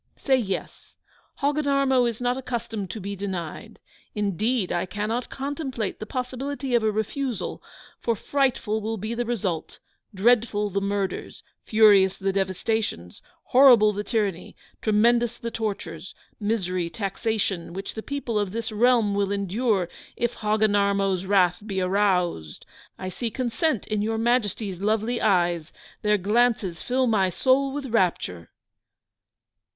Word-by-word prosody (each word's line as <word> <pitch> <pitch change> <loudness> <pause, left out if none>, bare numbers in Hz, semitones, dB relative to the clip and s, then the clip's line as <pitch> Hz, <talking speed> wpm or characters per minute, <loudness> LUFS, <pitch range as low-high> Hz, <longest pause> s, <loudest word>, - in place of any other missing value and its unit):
Say 265 -2 +2
yes; 195 -6 -5 0.4
Hogginarmo 275 -3 +2
is 230 - -6
not 245 0 +1
accustomed 235 -6 -4
to 220 - -5
be 200 +1 -5
denied. 190 +2 -5 0.4
Indeed 210 +1 0
I 175 +1 -1
cannot 215 +6 -3
contemplate 270 -6 -4
the 215 - -6
possibility 260 +2 -4
of 240 - +4
a 220 0 +2
refusal: 220 +3 -3 0.4
for 230 - 0
frightful 250 -3 0
will 220 +1 -3
be 215 +3 -4
the 240 +1 -2
result; 190 -9 -3 0.3
dreadful 210 0 +2
the 200 +1 0
murders; 200 -1 -3 0.2
furious 200 -3 +5
the 195 0 -1
devastations; 190 - -2 0.2
horrible 245 -5 +6
the 205 +1 -3
tyranny; 205 -5 -2 0.3
tremendous 235 +2 +3
the 235 -1 -5
tortures, 190 -7 -5 0.2
misery, 185 -5 -1
taxation, 195 -3 -2
which 195 +3 -6
the 220 - -5
people 255 -5 -2
of 205 -2 -2
this 230 0 -3
realm 225 -1 +3
will 200 0 0
endure, 200 0 0 0.3
if 240 0 0
Hogginarmo's 200 -3 +1
wrath 180 -2 +3
be 200 -3 -3
aroused! 180 - 0 0.3
I 185 - -5
see 230 +5 -3
consent 255 - -1
in 215 -1 -1
Your 220 +1 -1
Majesty's 220 -5 0
lovely 220 +3 0
eyes 175 -4 +2 0.3
their 210 0 +3
glances 210 -3 +1
fill 255 +1 +1
my 205 -5 +2
soul 265 +7 +2
with 285 0 -4
rapture! 180 - 0
215 Hz, 135 wpm, -25 LUFS, 195-240 Hz, 0.4 s, horrible